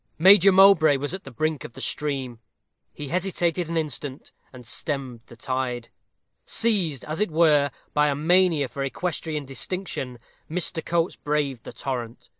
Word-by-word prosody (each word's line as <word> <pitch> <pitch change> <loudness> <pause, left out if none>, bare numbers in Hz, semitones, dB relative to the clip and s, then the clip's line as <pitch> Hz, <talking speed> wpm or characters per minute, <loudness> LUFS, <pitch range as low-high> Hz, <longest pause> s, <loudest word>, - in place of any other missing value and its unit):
Major 195 +3 +7
Mowbray 190 -6 +6
was 145 +4 -3
at 190 - -6
the - - -8
brink 155 +2 -2
of - - -9
the 135 - -11
stream. 135 -4 -2 0.5
He 145 -2 -8
hesitated 175 -1 -1
an 170 - -1
instant, 145 -3 -4 0.2
and 125 -2 -12
stemmed 130 0 -4
the 120 - -13
tide. 125 -1 -3 0.5
Seized, 185 - 0
as 155 +6 -4
it 210 - +2
were, 155 -3 +4 0.2
by 150 0 +3
a 145 - +1
mania 165 -1 +3
for 135 +2 -5
equestrian 155 +1 -3
distinction, 135 -2 -4 0.3
Mr. 165 0 -1
Coates 170 +1 0
braved 145 -5 -2
the - - -8
torrent. 120 -3 -5
150 Hz, 155 wpm, -24 LUFS, 135-170 Hz, 0.5 s, Major